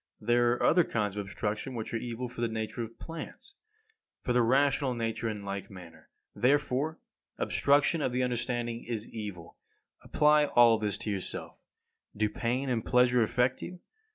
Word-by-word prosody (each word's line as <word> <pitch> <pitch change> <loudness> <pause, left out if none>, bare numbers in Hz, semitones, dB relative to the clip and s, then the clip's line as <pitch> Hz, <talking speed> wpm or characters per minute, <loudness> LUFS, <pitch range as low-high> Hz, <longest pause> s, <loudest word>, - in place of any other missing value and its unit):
There 120 +2 +3
are 125 - -3
other 175 +1 +5
kinds 105 -8 -2
of 105 - -2
obstruction 105 +6 -4
which 110 0 -5
are - - +1
evil 120 +1 -4
for 120 0 -8
the 120 - +2
nature 110 +1 -4
of 115 0 -7
plants. 165 - -8 0.7
For 125 - 0
the 125 - +4
rational 135 +1 +2
nature 115 0 -2
in 105 -2 -5
like 100 0 -5
manner, 90 -4 -13 0.3
therefore, 140 +3 +1 0.4
obstruction 145 +3 +2
of 130 - 0
the 125 +1 0
understanding 120 -1 -2
is 115 -2 -4
evil. 100 -7 -8 0.5
Apply 150 0 +4
all 120 -5 +5
this 105 -3 -1
to 105 - -3
yourself. 95 -2 -5 0.6
Do 105 0 +2
pain 125 +5 -1
and 120 -4 0
pleasure 125 -1 +4
affect 125 +3 +1
you? 180 0 -7
120 Hz, 165 wpm, -30 LUFS, 110-130 Hz, 0.7 s, other